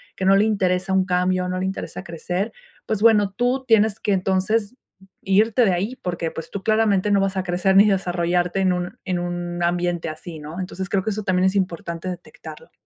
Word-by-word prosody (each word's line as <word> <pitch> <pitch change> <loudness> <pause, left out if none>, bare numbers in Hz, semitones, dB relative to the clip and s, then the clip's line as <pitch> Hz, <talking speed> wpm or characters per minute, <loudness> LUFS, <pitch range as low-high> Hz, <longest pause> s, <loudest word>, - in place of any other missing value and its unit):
que - - -5
no 195 +1 +6
le 200 +2 +4
interesa 190 -3 0
un 190 0 +3
cambio, 180 0 0
no 185 - -2
le 185 - -1
interesa 190 0 -5
crecer. 180 +5 -3 0.3
Pues, 215 -2 -2
bueno, 210 -3 +5
tú 250 +3 0
tienes 220 -2 +3
que 205 - 0
entonces, 195 +4 0 0.5
irte 215 +5 +3
de 195 - +3
ahí 200 +8 -2
porque, 175 -2 -2
pues, 160 - -8
tú 200 - -5
claramente 215 -2 +2
no 200 - +4
vas 195 0 -1
a 190 - 0
crecer 180 +1 +1
ni 200 +2 +7
desarrollarte 180 -1 0
en 190 -1 +3
un 180 0 -4
en 185 -2 -2
un 175 0 -3
ambiente 175 -1 0
así, 160 +1 -8
¿no? 155 +4 -8
Entonces 185 0 -5
creo 195 -2 0
que 220 - -1
eso 215 +1 -4
también 185 -1 +1
es 190 +1 +2
importante 170 -2 -2
detectarlo. 185 - -9
190 Hz, 205 wpm, -22 LUFS, 175-205 Hz, 0.5 s, ni